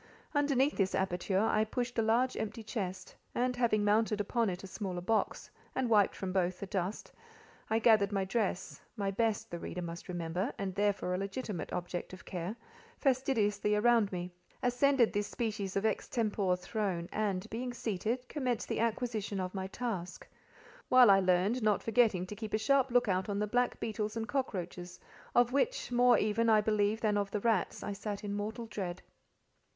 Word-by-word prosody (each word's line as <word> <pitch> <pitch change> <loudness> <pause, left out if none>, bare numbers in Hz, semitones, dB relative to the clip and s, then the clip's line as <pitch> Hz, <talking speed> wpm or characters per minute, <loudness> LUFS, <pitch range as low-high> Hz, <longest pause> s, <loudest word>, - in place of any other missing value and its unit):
Underneath 285 -1 +2
this 195 -1 +1
aperture 190 +1 0
I 215 -1 +3
pushed 240 +2 -2
a - - +5
large 235 +4 +2
empty 220 +1 -4
chest, 190 -4 -4 0.2
and 250 +1 +1
having 225 -4 +2
mounted 210 0 +2
upon 225 +2 +1
it 180 +1 -5
a - - -6
smaller 190 -2 -4
box, 220 +5 -1 0.2
and 255 -3 0
wiped 205 -3 +4
from 185 -1 -4
both 185 -1 0
the - - -4
dust, 190 +1 -3 0.6
I 220 - +2
gathered 215 -3 +4
my 195 -1 0
dress 195 -2 -2 0.2
(my 200 -1 0
best, 220 +1 0
the 170 - -4
reader 180 - -5
must 170 +1 -7
remember, 175 +5 -2
and 195 -1 -3
therefore 200 -2 0
a 180 - -1
legitimate 200 -1 -4
object 175 +1 -4
of 185 - -11
care) 180 +4 -4 0.4
fastidiously 225 -7 +1
around 225 -1 +4
me, 180 -1 -4 0.3
ascended 250 0 +3
this 205 0 0
species 210 -5 -3
of 195 +2 0
extempore 210 -3 0
throne, 180 -2 -2
and 205 -2 -1
being 245 +2 -3
seated, 235 +2 -2
commenced 250 -6 -2
the - - -1
acquisition 225 -3 -1
of 185 0 -3
my 190 -1 -3
task; 190 -5 -5 0.6
while 255 -4 +8
I 195 - +6
learned, 185 +6 +2
not 215 -2 +2
forgetting 220 -5 +3
to 210 - -7
keep 215 0 -3
a - - +3
sharp 270 +4 +3
look 245 -1 +3
out 190 0 0
on 200 - -1
the 210 - +1
black 245 +4 0
beetles 215 -1 -3
and 225 0 -2
cockroaches, 180 -9 -3 0.4
of 240 0 +5
which, 450 - 0
more 245 0 +5
even, 220 +2 +1
I 215 -1 +6
believe, 210 +1 +1
than 210 -2 +2
of 200 -1 -1
the 205 +1 -2
rats, 225 -5 0
I 205 - -3
sat 205 +1 -5
in 205 -1 -3
mortal 220 +3 -3
dread. 185 -5 -5
210 Hz, 180 wpm, -32 LUFS, 190-235 Hz, 0.6 s, while